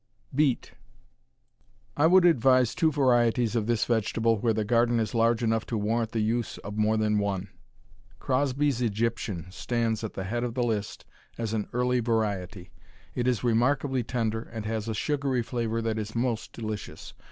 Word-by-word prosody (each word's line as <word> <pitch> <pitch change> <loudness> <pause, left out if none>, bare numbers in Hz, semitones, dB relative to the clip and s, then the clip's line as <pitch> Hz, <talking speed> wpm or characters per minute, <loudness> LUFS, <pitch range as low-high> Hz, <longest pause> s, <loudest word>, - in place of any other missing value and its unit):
Beet 140 -2 +1 1.2
I 150 +2 +4
would 180 +1 +6
advise 130 -6 +4
two 165 -3 +2
varieties 120 -4 +2
of 110 -2 0
this 120 -2 +1
vegetable 115 -1 +1
where 115 +2 +2
the 110 -1 -1
garden 120 +1 +2
is 110 -1 -2
large 115 0 +2
enough 115 -1 +1
to 115 - -2
warrant 110 +2 0
the 115 - -1
use 115 +2 -1
of 105 +1 -8
more 110 +1 +2
than 105 -1 +2
one. 100 -2 -2 0.7
Crosby's 135 0 0
Egyptian 110 -5 -1
stands 115 +1 -1
at 110 - -4
the 95 - -4
head 120 +5 -2
of 120 -1 -3
the 125 - +1
list 110 -3 -3 0.3
as 115 -2 -3
an 105 -2 -1
early 125 +1 +1
variety. 105 -5 -2 0.4
It 120 0 -1
is 125 -2 +1
remarkably 130 +3 +2
tender, 115 -2 -2
and 110 -2 -8
has 110 0 -3
a 110 - -2
sugary 140 -2 0
flavor 115 -1 -2
that 110 -1 -1
is 110 +1 -6
most 115 -2 -1
delicious. 110 -2 -6
115 Hz, 170 wpm, -27 LUFS, 110-125 Hz, 1.2 s, would